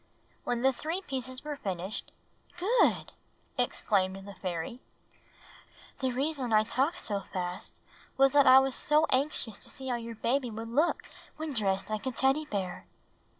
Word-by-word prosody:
When 245 0 -1
the 265 0 +4
three 325 +8 -3
pieces 260 -5 -4
were 300 -1 -4
finished, 190 -4 -4 0.5
''Good!" 420 +8 +3 0.5
exclaimed 195 -1 0
the 200 - -8
fairy. 185 +6 -4 1.2
''The 260 -1 0
reason 275 -2 0
that 220 - +3
I - - +2
talked 265 +8 +1
so 205 -2 -1
fast 180 0 -4 0.4
was 270 0 +6
that 285 -1 +6
I 260 - +10
was 265 0 +4
so 305 +4 +3
anxious 255 -5 0
to - - -10
see 265 -1 -6
how 245 - 0
your 230 0 -7
baby 250 +3 0
would 225 +1 -6
look 295 +9 +2 0.3
when 310 -1 -4
dressed 195 -3 0
like 215 +4 -2
a - - 0
Teddy 270 +5 +2
Bear." 185 - -4
255 Hz, 160 wpm, -30 LUFS, 205-275 Hz, 1.2 s, I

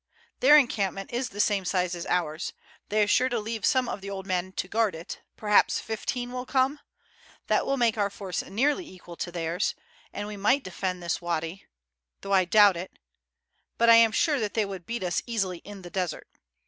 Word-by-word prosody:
"Their 295 +4 +8
encampment 195 -7 0
is 245 +1 -1
the 205 - -10
same 205 -2 +2
size 180 -1 0
as 170 -1 -5
ours; 165 -2 -1 0.4
they 210 +1 +3
are - - 0
sure 255 +4 +3
to 245 - -1
leave 220 -1 -5
some 260 -3 +2
of - - -4
the 200 - -7
old 190 -1 -6
men 185 -1 -1
to 180 - -3
guard 220 -2 +1
it, 165 +1 -8 0.2
perhaps 210 -1 +3
fifteen 245 +2 -4
will 250 0 -5
come. 270 +2 +1 0.7
That - - +1
will 275 - +1
make 230 -3 +2
our 200 -1 +2
force 195 -2 -4
nearly 290 - 0
equal 180 -2 -12
to 175 - -4
theirs, 170 0 -1 0.4
and 205 - -5
we 210 -1 -7
might 235 +8 +2
defend 185 -1 -4
this 170 0 -2
wady, 170 +1 -3 0.5
though 195 - -3
I 190 -1 +5
doubt 205 0 +6
it, 180 +2 -8 0.8
but 230 0 +5
I - - +10
am 230 -1 +6
sure 290 +5 +2
that 210 -3 -3
they 220 -2 +2
would 190 -3 -8
beat 235 -3 -3
us 175 -1 0
easily 195 -7 -2
in 200 0 -11
the 175 - -10
desert. 180 -3 -3
200 Hz, 205 wpm, -27 LUFS, 180-230 Hz, 0.8 s, I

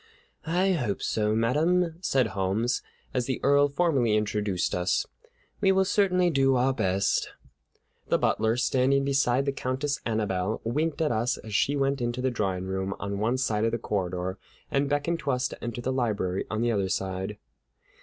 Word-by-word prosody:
"I 180 +4 +2
hope 125 - -1
so, 105 0 +1
madame," 160 +9 +2
said 130 -9 +2
Holmes, 105 +5 0 0.3
as 125 -2 -1
the 130 - -1
Earl 140 +1 +5
formally 140 -9 +2
introduced 105 -3 -1
us. 90 0 +1 0.6
"We 195 -2 +5
will 190 0 +3
certainly 185 -3 +2
do 135 -2 +3
our 130 +2 +2
best." 100 -5 +1 0.8
The - - +3
butler, 110 +2 +1
standing 135 +2 +2
beside 135 -1 +2
the 140 - +1
Countess 135 +2 -2
Annabelle, 105 -3 -1
winked 155 +7 -1
at 150 - +1
us 120 +2 0
as 110 - -9
she 140 +7 +2
went 140 -1 0
into 120 +1 -2
the 130 0 0
drawing 95 -5 -2
room 95 +1 -2
on 100 0 -3
one 115 +5 +1
side 110 -5 0
of 115 - +2
the - - +1
corridor, 95 -3 -3 0.3
and 140 0 +1
beckoned 145 +4 0
to 140 - -4
us 125 0 +1
to - - -10
enter 120 0 -4
the 130 +2 -1
library 105 -7 -1
on 110 +2 -1
the 120 - +2
other 100 -4 0
side. 95 +2 -3
120 Hz, 175 wpm, -27 LUFS, 105-140 Hz, 0.8 s, Earl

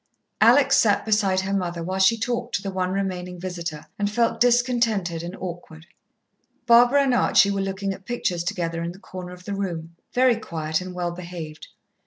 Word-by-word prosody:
Alex - - +6
sat - - +3
beside 200 -3 +2
her 195 +1 -3
mother 175 -3 -2
while 185 +3 -3
she 195 +4 +5
talked 240 +1 -2
to 200 - -2
the 195 - -3
one 185 -1 -1
remaining 180 -2 -3
visitor, 170 -4 -5
and 205 0 +1
felt 230 +2 +1
discontented 235 -8 +2
and 175 +3 -6
awkward. 170 -3 -8 0.8
Barbara 245 +4 +6
and 265 -2 +1
Archie 200 -4 +4
were 200 -1 -1
looking 195 0 -2
at 190 0 -13
pictures 180 -8 -1
together 170 -3 -2
in 170 +1 -4
the - - -14
corner 185 -2 -8
of 180 0 -12
the 205 - -4
room, 170 -4 -4 0.2
very 250 -2 +3
quiet 160 -6 -3
and 180 0 -7
well 175 -1 -2
behaved. 170 -3 -8
185 Hz, 185 wpm, -24 LUFS, 175-210 Hz, 0.8 s, Alex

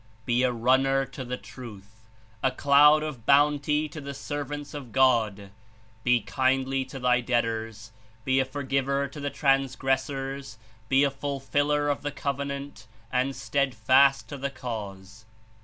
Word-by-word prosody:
Be 120 0 +2
a 130 -1 +2
runner 130 +3 +2
to 135 0 -8
the 125 0 -4
Truth; 110 -3 -12 0.3
a 130 - +3
cloud 145 +3 +5
(of 135 -7 -7
bounty) 150 +1 +3
to 155 - -8
the 140 0 -7
servants 145 +1 -5
of 140 -5 -8
God; 110 -6 +2 0.5
be 125 -1 +3
kindly 130 +4 0
to 130 +1 -9
thy 125 -1 +2
debtors; 115 -2 -2 0.3
be 130 0 +2
a 130 - +2
forgiver 140 0 -1
to 140 +2 -10
the 145 0 -2
transgressors; 135 -1 -1 0.3
be 135 +1 +4
a 140 - +2
fulfiller 145 +1 -1
of 145 -1 -1
the 145 - -2
Covenant 140 -3 -5 0.2
and 130 +2 0
steadfast 135 0 +2
to 145 - -6
the 140 +1 -3
Cause. 110 -4 -7
135 Hz, 140 wpm, -26 LUFS, 120-140 Hz, 0.5 s, cloud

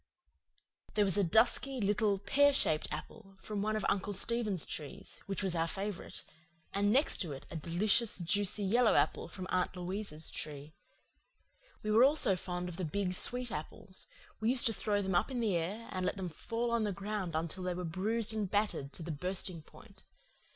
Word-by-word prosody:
There 210 -1 +4
was 190 - +1
a 205 - +3
dusky, 240 +8 +2
little, 205 -1 +1
pear 280 +9 +3
shaped 155 - +3
apple 195 +6 -8
from 210 0 -4
one 215 +1 0
of 215 - -2
Uncle 200 +1 0
Stephen's 210 -3 +1
trees 155 +6 -7
which 195 +1 -2
was 190 -3 0
our 165 -1 0
favourite; 195 +2 -4 0.5
and 205 +1 +2
next 275 +6 +3
to 165 -6 -2
it 135 - -10
a - - -7
delicious, 195 +8 +2
juicy 200 +3 +1
yellow 230 +4 +3
apple - - +1
from 185 - -7
Aunt 185 0 0
Louisa's 180 -3 -3
tree. 150 0 -5 1.1
We 215 - -1
were 225 +3 +6
also 275 -8 +5
fond 180 0 -4
of 175 -2 -7
the 185 - -3
big 180 +3 -1
sweet 245 +5 +2
apples; 185 +5 -7 0.3
we 220 - +1
used 250 0 +7
to 225 - +3
throw 205 -1 0
them 190 0 -2
up 175 - +2
in 255 -2 -3
the 215 -6 +1
air 195 +8 -3
and 185 -1 -3
let 180 - -1
them 185 -2 -4
fall 230 +9 -3
on 235 -1 +1
the 210 - 0
ground 195 -3 -4
until 165 +3 -3
they 180 -1 -2
were 180 0 -4
bruised 215 +6 0
and 210 -3 -2
battered 205 -10 -1
to 170 - -8
the 165 - -4
bursting 180 +2 -1
point. - - -17
195 Hz, 195 wpm, -33 LUFS, 175-215 Hz, 1.1 s, used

